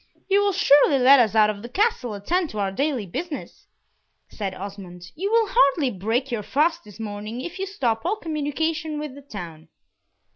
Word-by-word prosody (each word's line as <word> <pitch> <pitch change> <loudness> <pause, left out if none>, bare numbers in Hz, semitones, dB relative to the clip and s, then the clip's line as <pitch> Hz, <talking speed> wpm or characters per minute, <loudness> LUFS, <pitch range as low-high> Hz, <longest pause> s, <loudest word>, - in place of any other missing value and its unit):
"You 400 +1 +3
will 405 - +2
surely 290 -6 +5
let 265 +2 +7
us 225 -3 +2
of 210 -1 +3
the 235 - -8
Castle 375 - 0
attend 335 - -1
to 215 - -8
our 195 -1 0
daily 265 0 -1
business," 300 - -7 0.6
said 195 -3 -5
Osmond. 185 -2 -9
"You 390 +6 -3
will 455 -2 +3
hardly 280 - +3
break 225 +7 -2
your 230 -3 -1
fast 305 - +1
this 210 0 -14
morning 210 +2 -5
if 345 +6 -7
you 390 - -2
stop 240 - -1
all 370 +6 0
communication 315 -2 -2
with 300 -2 -5
the 285 - -12
town." 170 - -9
270 Hz, 180 wpm, -24 LUFS, 210-325 Hz, 0.6 s, let